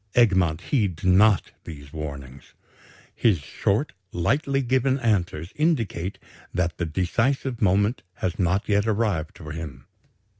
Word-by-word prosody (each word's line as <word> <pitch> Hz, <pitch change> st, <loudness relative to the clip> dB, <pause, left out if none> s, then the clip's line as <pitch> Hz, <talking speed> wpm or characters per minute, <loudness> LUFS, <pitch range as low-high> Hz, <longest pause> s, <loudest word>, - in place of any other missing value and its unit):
Egmont 95 Hz, -9 st, +3 dB
heeds 100 Hz, -, -1 dB
not 95 Hz, 0 st, +4 dB
these 70 Hz, -3 st, -10 dB
warnings. 70 Hz, -4 st, -8 dB, 0.6 s
His 110 Hz, -6 st, +3 dB
short, 100 Hz, -, -1 dB, 0.2 s
lightly 135 Hz, -, +1 dB
given 130 Hz, +1 st, +2 dB
answers 90 Hz, -7 st, 0 dB
indicate 115 Hz, -, 0 dB, 0.3 s
that 85 Hz, -2 st, -1 dB
the 85 Hz, -, -1 dB
decisive 115 Hz, -, 0 dB
moment 100 Hz, +4 st, +2 dB
has 90 Hz, -3 st, -3 dB
not 95 Hz, +2 st, +1 dB
yet 105 Hz, +1 st, +2 dB
arrived 100 Hz, -8 st, 0 dB
for 75 Hz, -2 st, -8 dB
him. 80 Hz, -2 st, -7 dB
95 Hz, 120 wpm, -25 LUFS, 80-115 Hz, 0.6 s, not